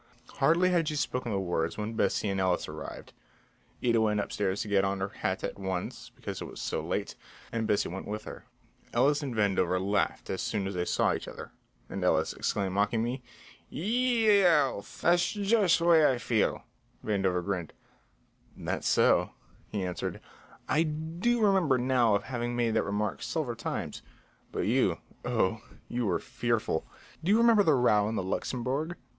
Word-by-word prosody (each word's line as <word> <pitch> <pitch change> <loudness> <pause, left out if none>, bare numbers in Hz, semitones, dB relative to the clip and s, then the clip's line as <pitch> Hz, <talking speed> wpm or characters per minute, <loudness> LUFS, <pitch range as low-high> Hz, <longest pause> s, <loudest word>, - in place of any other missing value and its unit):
Hardly 170 +6 +4
had 170 -3 +2
she 150 - -1
spoken 125 -4 -2
the 100 - 0
words 85 -3 -1
when 105 +1 -3
Bessie 110 - +1
and 95 -1 -1
Ellis 90 -2 +1
arrived. 75 +1 -8 0.7
Ida 115 -2 +3
went 105 -1 +2
upstairs 100 -1 -1
to - - -9
get 100 -1 +3
on 95 0 0
her 95 +1 -2
hat - - -3
at - - -4
once, 95 -2 -4
because - - -6
it - - -4
was - - -9
so - - -2
late, - - -3 0.4
and 115 -1 -1
Bessie 105 - +2
went 95 +3 -6
with 105 +1 -4
her. - - -9 0.5
Ellis 140 +5 +3
and 135 -5 -4
Vandover 95 -4 +2
laughed 100 +2 -1
as 95 - -2
soon 105 -3 -1
as 95 - -3
they 90 -1 -1
saw - - +2
each - - -5
other, - - -9 0.4
and 95 -1 -5
Ellis 80 -3 +2
exclaimed 95 -2 -1
mockingly, 115 +5 0 0.5
"Ye 235 +5 +1
e - - +3
ow, 145 -10 +3
thash 175 +10 +1
jush 205 -3 +3
way 170 -2 +5
I 130 - -1
feel." 115 -2 0 0.4
Vandover 95 -4 0
grinned: 90 -5 -2 0.9
"That's - - -3
so," - - +3 0.4
he 100 -3 -2
answered. 90 -1 -4 0.5
"I 155 - +3
do 165 +9 0
remember 185 -10 +3
now 125 -4 +3
of 100 - -1
having 120 -1 -3
made 120 -2 +1
that 110 - +3
remark 105 +1 -2
several 145 -8 -2
times. 115 - -4 0.5
But - - -2
you - - +2 0.3
oh, - - 0 0.3
you 120 -2 -1
were 90 - +2
fearful. 115 -9 -1 0.4
Do 180 - +2
you 215 - +6
remember 230 -2 +6
the 160 -7 +4
row 105 -5 +3
in 110 - -3
the 95 - -1
Luxembourg? 130 - -2
115 Hz, 175 wpm, -29 LUFS, 100-155 Hz, 0.9 s, you